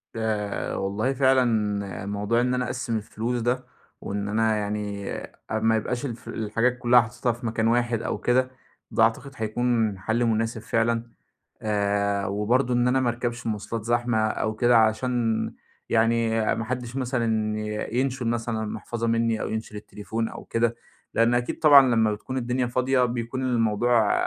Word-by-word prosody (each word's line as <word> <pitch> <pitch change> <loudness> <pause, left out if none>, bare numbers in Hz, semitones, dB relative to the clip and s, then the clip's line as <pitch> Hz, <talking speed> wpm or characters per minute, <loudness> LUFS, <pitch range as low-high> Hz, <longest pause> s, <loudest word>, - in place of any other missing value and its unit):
ده 110 -2 -2
والله 105 +7 -1
فعلًا 130 -1 +4 0.6
موضوع 105 +3 0
إن 125 +1 +1
أنا 125 0 0
أقسّم 120 -2 -2
الفلوس 115 +3 -3
ده 125 +2 0 0.4
وإن 100 0 -3
أنا 110 +1 +2
يعني 105 -1 -3 0.4
أ 110 - +1
ما 110 +1 +3
يبقاش 120 +4 -2
الف 120 -4 -7
الحاجات 115 +3 0
كُلّها 120 0 +5
حاططها 115 +2 -2
في 120 +2 -8
مكان 110 0 0
واحد 120 -1 +1
أو - - -2
كده، 130 +1 +1 0.4
ده 110 - +3
أعتقد 115 +5 +1
هيكون 115 -2 0
حَل 110 +6 0
مناسب 115 0 0
فعلًا. 115 +1 0 0.6
آآ، 100 -1 0
وبرضه 120 +6 +1
إن 120 0 +3
أنا 130 +1 +2
ما 125 - +1
أركبش 120 0 -3
مواصلات 110 0 -3
زحمة 120 0 +1
أو 110 0 0
كده، 120 +2 +4
عشان 115 +1 +1 0.4
يعني 115 0 +2 0.2
ما 115 - -3
حدّش 125 +1 -4
مثلًا 115 -5 0
ي 105 +2 -3
ينشُل 130 -2 -1
مثلًا 115 -1 -1
المحفظة 115 +2 -4
منّي 115 -1 +1
أو - - -2
ينشُل 110 -1 -5
التليفون 110 +2 -4
أو - - -9
كده. 115 0 0 0.4
لإن 115 +1 +3
أكيد 120 0 -1
طبعًا 140 -6 +7
لمّا 110 -2 +3
بتكون 110 +5 -6
الدنيا 125 0 0
فاضية، 125 +1 +2
بيكون 120 +1 -3
الموضوع 115 -2 +2
115 Hz, 160 wpm, -25 LUFS, 110-125 Hz, 0.6 s, طبعًا